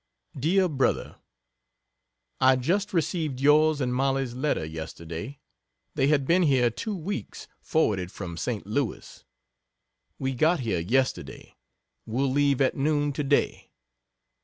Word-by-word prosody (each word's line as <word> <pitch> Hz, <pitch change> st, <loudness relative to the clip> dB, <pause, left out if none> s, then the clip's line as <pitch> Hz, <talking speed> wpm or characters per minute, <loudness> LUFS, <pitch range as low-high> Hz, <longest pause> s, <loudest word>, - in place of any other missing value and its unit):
DEAR 180 Hz, +8 st, +2 dB
BROTHER, 135 Hz, -5 st, -1 dB, 1.2 s
I 130 Hz, 0 st, +5 dB
just 185 Hz, +11 st, 0 dB
received 160 Hz, -6 st, -1 dB
yours 150 Hz, +2 st, +4 dB
and 125 Hz, -2 st, -1 dB
Mollies 135 Hz, -1 st, 0 dB
letter 130 Hz, -, -1 dB
yesterday 80 Hz, -, -7 dB, 0.5 s
they 135 Hz, -, +1 dB
had 145 Hz, -2 st, +2 dB
been 175 Hz, +6 st, +3 dB
here 130 Hz, -7 st, +3 dB
two 210 Hz, -, -4 dB
weeks 195 Hz, +4 st, -6 dB
forwarded 100 Hz, -, 0 dB
from 90 Hz, -5 st, -7 dB
St. 110 Hz, +4 st, -3 dB
Louis. 115 Hz, +3 st, -3 dB, 0.9 s
We 135 Hz, 0 st, -2 dB
got 155 Hz, +5 st, +2 dB
here 110 Hz, -8 st, -1 dB
yesterday 130 Hz, +10 st, -2 dB, 0.5 s
will 130 Hz, +4 st, 0 dB
leave 140 Hz, -1 st, +2 dB
at 130 Hz, -, +2 dB
noon 145 Hz, 0 st, +1 dB
to 150 Hz, -, -2 dB
day. 140 Hz, +1 st, 0 dB
135 Hz, 125 wpm, -26 LUFS, 120-155 Hz, 1.2 s, I